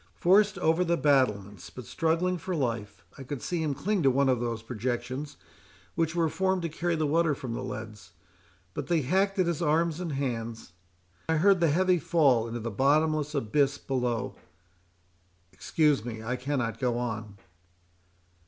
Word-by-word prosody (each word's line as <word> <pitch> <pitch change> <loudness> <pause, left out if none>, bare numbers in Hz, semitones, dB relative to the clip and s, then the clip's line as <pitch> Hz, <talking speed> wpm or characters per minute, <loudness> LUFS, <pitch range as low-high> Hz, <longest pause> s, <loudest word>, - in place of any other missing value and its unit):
—Forced 200 +3 +4
over 165 0 +2
the 170 -1 +1
battlements, 105 - +1
but 120 +8 -10
struggling 170 +2 0
for 180 +3 -3
life, 115 -7 -3
I - - -6
could 135 +1 -5
see 175 +4 -2
him 150 -3 -1
cling 195 +7 0
to 135 - +4
one 135 +1 +2
of 125 -2 +2
those 115 -2 -3
projections 125 +4 -4 0.6
which 165 0 -1
were 165 -1 +2
formed 190 +2 0
to 165 - -1
carry 170 +2 -1
the 155 -1 0
water 155 0 +2
from 130 -4 -6
the 120 - -4
leads, 110 -6 -7 0.6
but - - -5
they 170 -3 +2
hacked 195 +8 +1
at 185 - +3
his 170 -1 -1
arms 165 +1 +1
and 170 -4 -3
hands. 115 -7 -4 0.6
I 160 - +3
heard 195 +3 +4
the 170 -2 +3
heavy 180 +3 +3
fall 140 -8 +3
into 120 +1 -4
the 115 +1 -4
bottomless 150 +5 +2
abyss 140 +3 +1
below. 125 -3 -2 1.2
Excuse 150 -7 +1
me—I 115 +1 -4
cannot 125 -3 -2
go 125 -2 0
on." 110 -4 -4
140 Hz, 165 wpm, -28 LUFS, 120-165 Hz, 1.2 s, Forced